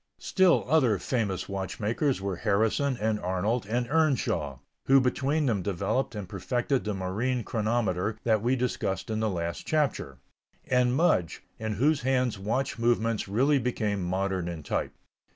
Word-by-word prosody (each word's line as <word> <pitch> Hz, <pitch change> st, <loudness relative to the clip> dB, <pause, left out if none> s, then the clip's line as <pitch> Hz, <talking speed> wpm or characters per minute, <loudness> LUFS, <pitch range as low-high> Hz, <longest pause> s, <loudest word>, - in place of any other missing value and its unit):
Still 185 Hz, -3 st, +3 dB
other 130 Hz, -8 st, +3 dB
famous 100 Hz, -1 st, -2 dB
watchmakers 105 Hz, +7 st, -1 dB
were 95 Hz, -2 st, -3 dB
Harrison 110 Hz, +7 st, +1 dB
and 110 Hz, 0 st, 0 dB
Arnold 95 Hz, +5 st, -1 dB
and 120 Hz, +2 st, -1 dB
Earnshaw, 130 Hz, -, +1 dB, 0.3 s
who 135 Hz, +1 st, +7 dB
between 140 Hz, +4 st, +1 dB
them 110 Hz, -7 st, +1 dB
developed 100 Hz, +8 st, -1 dB
and 105 Hz, -3 st, -5 dB
perfected 120 Hz, +8 st, -1 dB
the 105 Hz, -1 st, -2 dB
marine 110 Hz, +7 st, -1 dB
chronometer 110 Hz, -3 st, -1 dB
that 110 Hz, -3 st, +2 dB
we 125 Hz, +4 st, +2 dB
discussed 110 Hz, -6 st, -2 dB
in 110 Hz, -, -1 dB
the 110 Hz, 0 st, +1 dB
last 85 Hz, -3 st, -4 dB
chapter; 145 Hz, -, 0 dB, 0.5 s
and 125 Hz, -1 st, +2 dB
Mudge, 130 Hz, -, +1 dB, 0.2 s
in 110 Hz, -1 st, -2 dB
whose 140 Hz, +8 st, +2 dB
hands 125 Hz, -4 st, 0 dB
watch 115 Hz, +5 st, -2 dB
movements 115 Hz, -2 st, +1 dB
really 135 Hz, +8 st, +2 dB
became 110 Hz, -5 st, -1 dB
modern 95 Hz, 0 st, -1 dB
in 85 Hz, -3 st, -5 dB
type. -, -, -2 dB
110 Hz, 150 wpm, -28 LUFS, 95-130 Hz, 0.5 s, who